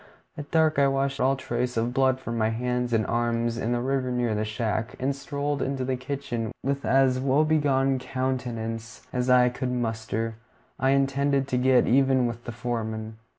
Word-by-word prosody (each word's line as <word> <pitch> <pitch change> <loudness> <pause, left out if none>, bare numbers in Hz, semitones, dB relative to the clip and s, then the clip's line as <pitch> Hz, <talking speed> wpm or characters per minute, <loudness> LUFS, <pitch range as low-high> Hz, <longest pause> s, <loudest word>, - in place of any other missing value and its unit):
At 145 -1 -8
dark 160 -2 +3
I 140 - +5
washed 135 0 0
all 135 +2 +3
trace 125 -2 -3
of 115 +2 0
blood 130 0 +2
from 115 -3 -5
my 110 -1 +1
hands 125 +1 -1
and 110 -2 +2
arms 115 0 0
in 115 0 -2
the 120 0 0
river 130 0 0
near 120 -2 0
the 105 0 -1
shack, 110 0 -2
and 135 +2 0
strolled 140 +1 -3
into 135 -1 -1
the 130 0 0
kitchen 125 -4 -4
with 140 +1 -1
as 130 -1 +3
woebegone 135 -1 +2
a - - -5
countenance 120 -3 -4
as 125 0 0
I 125 -1 +6
could 125 +1 -3
muster. 115 -2 -2 0.4
I 130 - +2
intended 140 0 +2
to 125 - +1
get 130 0 +4
even 130 0 +3
with 120 0 -4
the 120 - -4
foreman. 110 -2 -4
125 Hz, 185 wpm, -26 LUFS, 115-135 Hz, 0.4 s, I